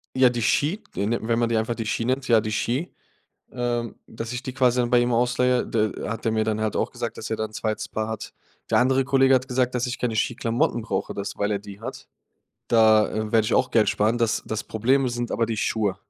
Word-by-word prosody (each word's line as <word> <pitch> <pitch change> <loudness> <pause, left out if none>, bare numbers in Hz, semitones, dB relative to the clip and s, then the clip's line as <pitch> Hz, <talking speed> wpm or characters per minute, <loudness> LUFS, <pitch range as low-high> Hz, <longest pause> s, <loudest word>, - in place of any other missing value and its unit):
Ja, 130 -1 +6
die 120 -2 -2
Ski, 160 - +1
die 100 +2 -1
wenn 115 0 0
man 120 -1 +1
die 115 - +1
einfach 110 +2 0
die 115 -2 -5
Ski 115 - -1
nennt 130 +2 -1
ja, 115 -2 +5
die 110 0 -3
Ski, 125 +9 -2 0.6
ähm, 120 -2 -2
dass 115 +1 -7
ich 120 +2 -4
die 130 - -5
quasi 125 -2 +2
dann 120 -1 0
bei 120 - +6
ihm 120 0 +1
ausleihe, 125 +1 +2
der 110 -3 -1
hat 115 +1 -4
der 115 - +1
mir 110 0 +1
dann 110 0 -1
halt 110 -1 -1
auch - - 0
gesagt, 115 -2 -5
dass 110 - -6
er - - +1
da 110 - -2
'n 110 - -10
2. 110 0 -3
Paar 110 0 -3
hat. 110 - -6 0.4
Der - - +3
andere 130 +1 +3
Kollege 135 0 +4
hat 130 0 +2
gesagt, 125 -1 0
dass 125 0 -1
ich 125 - -3
keine 115 -3 -2
Ski-Klamotten 115 0 0
brauche, 95 -3 -3
das 100 0 -4
weil 100 - +1
er 105 - 0
die 100 +1 -12
hat. - - -7 0.6
Da 110 -2 +5 0.2
werde 110 -2 +4
ich - - 0
auch 130 - +2
Geld 110 -2 +3
sparen. 110 +3 +1
Das 115 -1 +1
das 110 0 -4
Problem 130 +5 +1
sind 120 0 -3
aber 115 - 0
die 110 -1 -3
Schuhe. 105 -3 0
115 Hz, 245 wpm, -24 LUFS, 110-125 Hz, 0.6 s, Ja